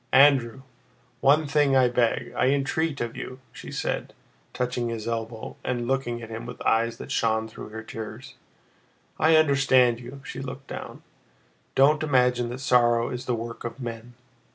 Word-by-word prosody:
"Andrew! 135 -3 +5 0.6
One 150 +3 +4
thing 145 -1 +2
I 130 -1 +5
beg, 120 -1 0
I - - +2
entreat 140 +3 0
of 120 -1 -3
you!" 130 - -6
she - - -10
said, - - -3 0.4
touching 125 -1 -2
his 115 -1 -5
elbow 115 -1 -4
and 120 -2 -2
looking 120 -3 -1
at 115 - -9
him 115 +1 -6
with 125 - -8
eyes 115 +1 +2
that - - -8
shone 110 -1 +1
through 110 - -10
her 110 +1 -7
tears. 110 0 -8 0.9
"I 160 +1 +5
understand 135 -5 +4
you" 125 +3 -10
(she 130 - -7
looked 135 0 -7
down). - - -8 0.7
"Don't 145 +3 +5
imagine 125 -5 +2
that 125 +2 -6
sorrow 120 -3 +3
is 125 0 -5
the 125 - 0
work 115 +1 -6
of 120 +2 -6
men. 120 -1 -7
125 Hz, 165 wpm, -26 LUFS, 115-135 Hz, 0.9 s, Andrew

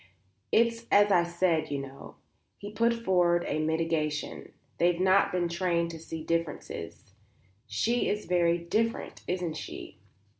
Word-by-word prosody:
"It's 230 0 +2
as 205 0 +5
I 175 -3 +5
said, 170 -1 0
you 140 - -2
know," 135 0 -9 0.4
he 205 0 -8
put 230 +2 +2
forward 180 -7 +2
a - - -1
mitigation; 155 -1 -1 0.3
"they've 175 0 +3
not 190 +1 +4
been 180 -1 0
trained 170 -1 0
to 165 - -8
see 160 0 -7
differences; 165 - -4 0.5
she 240 - 0
is 210 +1 -2
very 175 -1 +2
different, 215 +7 -2
isn't 175 -3 -2
she?" - - -8
175 Hz, 140 wpm, -29 LUFS, 165-200 Hz, 0.5 s, as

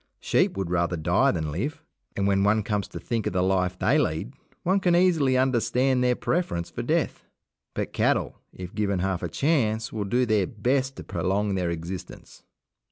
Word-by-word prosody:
Sheep - - +1
would 95 -3 -2
rather 85 0 0
die 85 +3 +2
than 80 -3 -1
live 115 - -4 0.3
and 100 - 0
when 100 0 +2
one 105 +1 +3
comes 105 -1 -1
to - - -8
think 115 -3 -2
of - - -2
the 90 -1 +1
life 90 -1 +1
they 120 +12 +3
lead, 80 - -1 0.3
one 190 +3 +2
can 175 -2 +2
easily 165 -8 +3
understand 130 0 +2
their 125 0 +3
preference 120 - -2
for - - -4
death; - - -1 0.5
but - - -3
cattle, - - 0
if 90 0 -9
given 100 -2 0
half 95 0 -1
a 85 - -3
chance, 115 - 0
will 105 -2 -2
do 125 +5 +1
their 105 -5 +2
best 130 +5 0
to - - -8
prolong 100 +2 -1
their 90 -2 0
existence. 85 +2 -7
105 Hz, 185 wpm, -26 LUFS, 90-130 Hz, 0.5 s, one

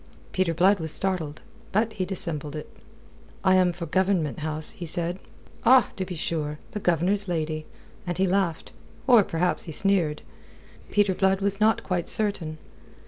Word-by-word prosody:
Peter 185 -3 +1
Blood 185 +4 +3
was 160 -2 -3
startled. 170 -6 -2 0.3
But 220 +2 +1
he 190 -4 -2
dissembled 155 -6 -4
it. 150 - -6 0.8
"I 190 -1 +4
am 185 -1 +4
for 170 0 -6
Government 180 -3 0
House," 155 0 -1
said 170 +3 0
he. - - -25 0.3
"Ah! 260 -1 +6
To 190 - -3
be 180 -1 -6
sure! 155 -2 -2
The 210 - -4
Governor's 190 +3 +1
lady." 155 -2 -2 0.4
And 175 - -2
he 190 - +3
laughed; 185 -3 0 0.3
or 240 -5 +7
perhaps 175 0 -1
he 165 - -6
sneered. 170 -4 +2 0.7
Peter 205 -2 +2
Blood 190 +1 +2
was 200 0 0
not 220 +1 +3
quite 180 -2 -2
certain. 190 -7 -1
180 Hz, 160 wpm, -25 LUFS, 160-195 Hz, 0.8 s, or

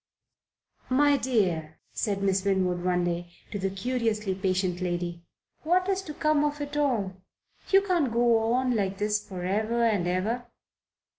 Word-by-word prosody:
"My 285 +2 +4
dear," 185 - 0 0.2
said 200 -2 -1
Miss 195 -1 +2
Winwood 185 -3 +1
one 180 -1 +1
day 175 0 -2 0.2
to 205 - -3
the 195 0 0
curiously 215 0 -1
patient 185 -1 -1
lady, 175 -1 -2 0.4
"what 360 +4 +2
is 385 -1 +1
to 315 -6 -8
come 305 -1 +2
of 295 0 -1
it 290 0 -5
all? 240 -10 +1 0.6
You 390 0 +5
can't 345 -10 +1
go 230 -1 +3
on 250 0 +1
like 195 -2 -1
this 210 +1 0
for 185 -3 -7
ever 220 +5 0
and 205 -6 +2
ever." 220 +7 -1
210 Hz, 155 wpm, -27 LUFS, 185-255 Hz, 0.6 s, You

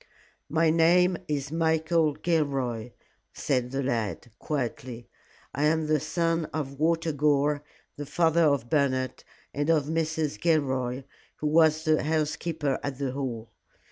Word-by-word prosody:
"My 160 0 +3
name 175 +3 +4
is 140 -1 -3
Michael 160 -1 +1
Gilroy," 135 -9 -1 0.5
said 125 -3 -1
the 135 +2 -2
lad, 120 -2 -2
quietly. 120 -4 -4 0.5
"I 145 +3 0
am 160 +1 +2
the 155 0 +2
son 165 +2 0
of 140 -3 -5
Walter 165 +1 +1
Gore, 145 0 +1 0.3
the 145 -1 -6
father 165 +2 +3
of 140 -5 +1
Bernard, 130 -2 0 0.3
and 145 +2 -1
of 155 -4 +3
Mrs. 160 -1 -2
Gilroy, 135 -6 0 0.3
who - - -6
was 155 0 +4
the 155 -1 +2
housekeeper 155 -1 -1
at 140 -2 -4
the 135 -2 -2
Hall. 125 -4 -5
150 Hz, 135 wpm, -27 LUFS, 135-160 Hz, 0.5 s, name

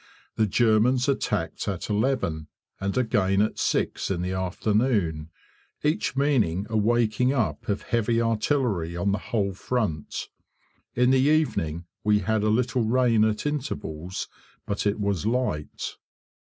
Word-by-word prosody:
The 110 -1 +2
Germans 120 +4 +3
attacked 105 -12 -1
at 95 -4 -3
eleven, 105 - 0 0.3
and 100 +4 -2
again 100 -5 +2
at 105 +1 +1
six - - 0
in 90 -2 -1
the 90 - -2
afternoon, 95 -3 0 0.5
each 150 -1 0
meaning 115 - +1
a - - -1
waking 120 +3 +2
up 125 -5 -1
of 100 - -1
heavy 115 0 +1
artillery 115 - 0
on 100 +3 +1
the 100 - 0
whole 100 -2 -1
front. 95 - -2 0.7
In 125 +1 +4
the 130 - +4
evening 125 - +1 0.2
we 105 0 +4
had 110 +2 0
a 105 - +1
little 125 +3 +1
rain 115 -1 +3
at 110 +2 -1
intervals, 95 - -4 0.4
but 100 +1 -1
it 105 +1 0
was 100 -1 -1
light. 115 -11 -2
110 Hz, 140 wpm, -26 LUFS, 95-125 Hz, 0.7 s, In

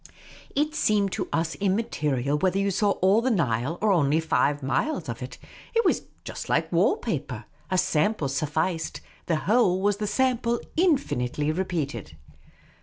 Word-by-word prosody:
It 300 +2 +1
seemed 205 -8 +2
to - - -3
us 165 -1 -1
im 195 -1 +2
material 145 - -1
whether 185 +5 +1
you 200 0 +1
saw 205 +1 +2
all 195 +4 +5
the 260 - +1
Nile 145 - 0
or 215 -1 +3
only 155 -4 +3
five 145 -3 +1
miles 135 - -1
of - - -5
it. - - -7 0.4
It 460 - +3
was - - +3 0.2
just - - -7
like - - +1
wall - - +3
paper. 450 - -4 0.2
A 185 - +1
sample 180 -1 +1
sufficed; 155 +4 -2 0.3
the 165 - +2
whole 190 +1 +2
was 205 +1 +1
the 210 0 -2
sample 240 -1 +1 0.2
infinitely 155 - +1
repeated. 155 - -3
185 Hz, 160 wpm, -26 LUFS, 150-215 Hz, 0.4 s, all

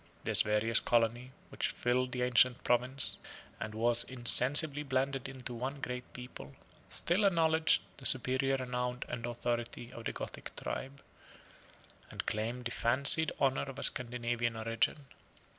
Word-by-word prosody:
This - - +5
various 110 +2 +3
colony, 120 +2 0 0.2
which - - -2
filled 125 +1 -1
the 125 0 -2
ancient 125 0 +3
province, 125 +2 0 0.4
and 110 0 -6
was 120 +1 +1
insensibly 135 +4 +5
blended 135 -1 -2
into 130 -2 -6
one 130 +4 -5
great 125 -2 -6
people, 95 - -10 0.3
still 180 +5 +1
acknowledged 160 -4 +3
the 130 - +3
superior 130 +2 +3
renown 125 -1 -3
and 120 -1 -5
authority 120 0 -4
of 115 - -10
the - - -1
Gothic - - -8
tribe, 135 +1 -6 1.1
and - - -6
claimed 115 +4 -3
the 120 - -2
fancied 140 +8 +2
honor 135 -1 +2
of 135 - -9
a - - -5
Scandinavian 120 -1 -1
origin. 115 +6 -1
125 Hz, 140 wpm, -32 LUFS, 120-135 Hz, 1.1 s, This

